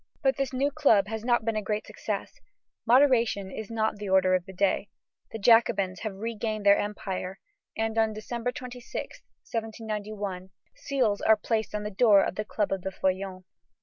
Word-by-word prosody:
But 270 -1 +3
this 275 -2 -2
new 275 +2 0
club 250 -10 +4
has 220 0 -4
not 240 -2 +2
been 225 -1 0
a 215 - 0
great 210 +1 -2
success; - - -5 0.5
moderation 235 -6 +4
is 220 +1 -6
not 220 -2 -1
the 205 -1 -5
order 190 -1 +4
of 180 -1 0
the - - -8
day; 195 +1 0 0.4
the - - -4
Jacobins 220 -4 +3
have 215 -3 -4
regained 215 0 -3
their 200 0 +6
empire, 195 -2 -4 0.4
and 225 0 -1
on 220 -1 +3
December 235 +3 -4
26, 250 -1 -7 0.2
1791, 210 -4 -5 0.3
seals 245 -7 0
are 220 - +5
placed 220 0 -2
on 210 - -2
the 210 - -4
door 205 -1 +5
of - - -2
the 210 - -3
Club 210 -1 -1
of 195 -1 -1
the 190 - -3
Feuillants. 190 0 -2
215 Hz, 180 wpm, -27 LUFS, 195-230 Hz, 0.5 s, their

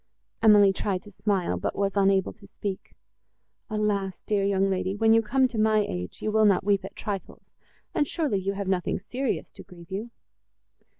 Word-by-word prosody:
Emily 205 -3 +6
tried 190 -1 -2
to 205 - -13
smile, 195 -2 -1
but - - -3
was 200 0 -1
unable 195 -1 +2
to 205 -3 -17
speak. 200 -1 -6 0.7
"Alas! 205 -3 -1
dear 205 -2 +1
young 195 0 +2
lady, 190 0 -1
when 225 +1 +4
you 225 - +5
come 260 +4 +2
to 235 -3 -5
my 215 -1 +3
age, 90 0 -6
you 215 - 0
will 220 0 +4
not 200 -3 +4
weep 200 -1 +2
at 195 - -9
trifles; 200 -3 -6 0.4
and 295 - +1
surely 285 - 0
you 195 +1 -2
have 200 -1 -4
nothing 185 -2 0
serious, 250 +6 -3
to - - -12
grieve 170 -1 -15
you." 210 +5 -4
200 Hz, 185 wpm, -26 LUFS, 195-215 Hz, 0.7 s, Emily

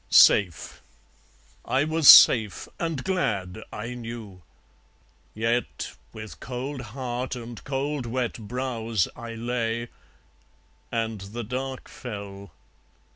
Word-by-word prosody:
Safe! 90 -6 +5 0.8
I 130 +2 +1
was 155 -1 +4
safe, 110 -6 +8
and 165 -6 -2
glad, 110 - -1
I 115 +3 -5
knew! 115 -6 -8 0.9
Yet 115 +2 -1 0.2
with 110 -1 -9
cold 130 +2 -5 0.2
heart 125 0 -3
and 120 -1 -8
cold 135 -1 -2
wet 120 0 -1
brows 115 -3 -1
I 115 -2 -7
lay. 115 0 -2 1.0
And 115 -3 -2
the 105 +5 -6
dark 130 +3 -4
fell. 100 -5 -8
120 Hz, 100 wpm, -26 LUFS, 110-130 Hz, 1.0 s, safe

